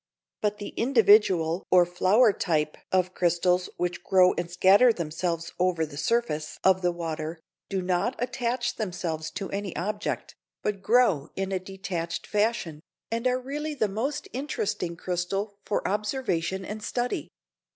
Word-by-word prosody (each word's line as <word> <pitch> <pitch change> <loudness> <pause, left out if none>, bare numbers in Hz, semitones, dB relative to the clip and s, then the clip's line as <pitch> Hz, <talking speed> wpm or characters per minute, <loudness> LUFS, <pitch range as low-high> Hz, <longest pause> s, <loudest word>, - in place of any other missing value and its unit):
But 210 0 0
the 205 - -6
individual 205 -8 +4
or 180 -1 +6
flower 195 +6 +4
type 155 -5 0 0.2
of 185 -1 +2
crystals 180 +1 +2
which 175 0 -2
grow 185 -1 +5
and 175 -1 -3
scatter 195 +7 +6
themselves 170 -2 -3
over 175 -3 +2
the 150 -2 -11
surface 155 -4 -1
of 190 0 +4
the 180 -1 +2
water, 165 -1 -4 0.3
do 190 -2 -1
not 180 +8 0
attach 245 0 -2
themselves 175 -6 -3
to 195 +1 -5
any 200 -2 -4
object, 210 +3 -3 0.3
but 210 -2 -2
grow 210 - +3
in 195 0 -2
a 190 - 0
detached 185 -3 -4
fashion, 210 -7 -1 0.3
and 230 +2 0
are 250 0 +1
really 295 +4 -4
the 220 -6 +1
most 225 +9 -3
interesting 215 - -2
crystal 195 +4 -3
for 205 - -1
observation 190 -4 -1
and 215 +2 -6
study. 245 +3 -2
190 Hz, 145 wpm, -27 LUFS, 175-215 Hz, 0.3 s, or